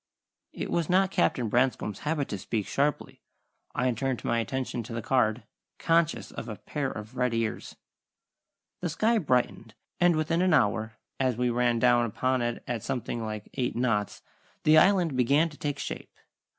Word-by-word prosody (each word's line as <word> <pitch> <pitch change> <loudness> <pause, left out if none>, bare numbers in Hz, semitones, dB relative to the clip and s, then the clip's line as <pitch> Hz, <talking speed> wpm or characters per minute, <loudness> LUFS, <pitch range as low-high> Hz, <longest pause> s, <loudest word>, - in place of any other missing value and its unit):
It - - -5
was 170 -3 0
not 190 +1 +3
Captain 115 - +1
Branscome's 120 -3 0
habit 150 -2 -1
to 100 - -4
speak 105 +1 -2
sharply. 145 +1 -1 0.5
I 125 0 +2
turned 130 +2 -2
my 115 - +1
attention 125 +1 -3
to 115 +1 -8
the 115 - -3
card, 125 -2 +1 0.3
conscious 165 -11 +1
of 115 - -7
a 110 - -4
pair 140 +5 -3
of 110 +3 -8
red 125 -2 +1
ears. 115 -1 -3 1.0
The 175 - -2
sky 220 +8 +2
brightened, 125 - 0 0.2
and 175 -1 +4
within 160 +2 +1
an 185 -3 +4
hour, 110 -3 +1 0.2
as 130 -3 +1
we 125 0 +1
ran 120 0 +2
down 120 0 +4
upon 130 +3 0
it 120 0 -2
at 120 -3 -2
something 120 -1 -3
like 105 -1 -5
eight 125 -3 -2
knots, 115 -4 -1 0.4
the 155 - +6
Island 175 -4 +4
began 140 +6 +3
to 150 - -14
take 145 -1 -3
shape. - - -6
125 Hz, 170 wpm, -28 LUFS, 115-150 Hz, 1.0 s, the